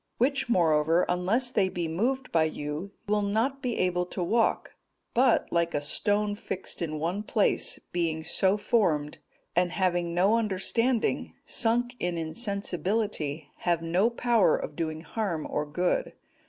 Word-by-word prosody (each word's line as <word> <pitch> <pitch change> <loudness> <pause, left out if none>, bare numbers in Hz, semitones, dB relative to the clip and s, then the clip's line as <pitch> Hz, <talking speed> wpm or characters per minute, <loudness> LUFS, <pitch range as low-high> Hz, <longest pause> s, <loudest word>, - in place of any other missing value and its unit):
which, 270 +1 +1
moreover, 165 -3 +3
unless 200 +8 +1
they 195 -6 +2
be 175 -2 -3
moved 250 +11 -1
by 165 -1 +4
you, 155 +4 -4 0.2
will 210 0 +2
not 225 +7 0
be 245 -3 -2
able 180 -1 +1
to 180 - -4
walk; 225 +6 +1 0.4
but, 250 0 +3
like 170 0 +1
a - - +2
stone 205 +7 0
fixed 195 -3 -5
in 155 -2 -2
one 170 +6 -2
place, 210 0 +2
being 165 -2 -1
so 190 +4 +2
formed, 175 -9 +1 0.4
and 175 0 +2
having 175 -2 0
no 195 +6 +4
understanding, 230 +4 0
sunk 240 +1 +1
in 175 -1 -1
insensibility, 185 -3 -2
have 170 -2 0
no 180 +7 +2
power 235 -7 +3
of 150 - -6
doing 155 -1 -3
harm 170 -2 -3
or 150 0 -2
good. 175 +4 0
185 Hz, 145 wpm, -28 LUFS, 165-225 Hz, 0.4 s, by